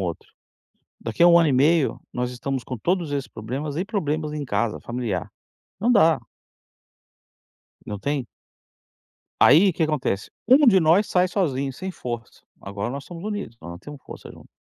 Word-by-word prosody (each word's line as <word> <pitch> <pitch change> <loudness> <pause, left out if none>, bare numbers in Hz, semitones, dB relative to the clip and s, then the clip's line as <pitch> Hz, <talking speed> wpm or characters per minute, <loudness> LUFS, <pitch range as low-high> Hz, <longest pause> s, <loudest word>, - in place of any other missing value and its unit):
outro, 85 -3 -5 0.7
daqui 115 +8 0
a 175 - +8
1 170 - +7
ano 165 -3 +3
e - - +1
meio 150 +3 +3
nós 125 0 -2
estamos 130 +1 -4
com 125 - -6
todos 170 - -1
esses 140 -2 -2
problemas 135 +7 -5
e 185 - -1
problemas 155 -7 -2
em 150 -1 -4
casa, 115 -4 -1
familiar, 120 -7 -4 0.5
não 235 - +2
dá." 165 -8 +5 1.7
Não 105 - -5
tem 140 -1 -2 1.2
Aí 180 +8 +7
que - - -16
que 160 - +2
acontece, 145 -10 -1 0.2
um 275 +3 +6
de 195 -5 +6
nós 170 +6 +4
sai 180 0 +3
sozinho 140 -8 -1
sem 190 +8 -6
força, 120 -7 -7 0.2
agora 100 +2 -4
nós 135 +2 -6
somos 175 0 -9
unidos, 205 - -5
nós 85 0 -9
temos 145 +6 -11
força - - -10
junto. - - -15
145 Hz, 170 wpm, -23 LUFS, 125-175 Hz, 1.7 s, a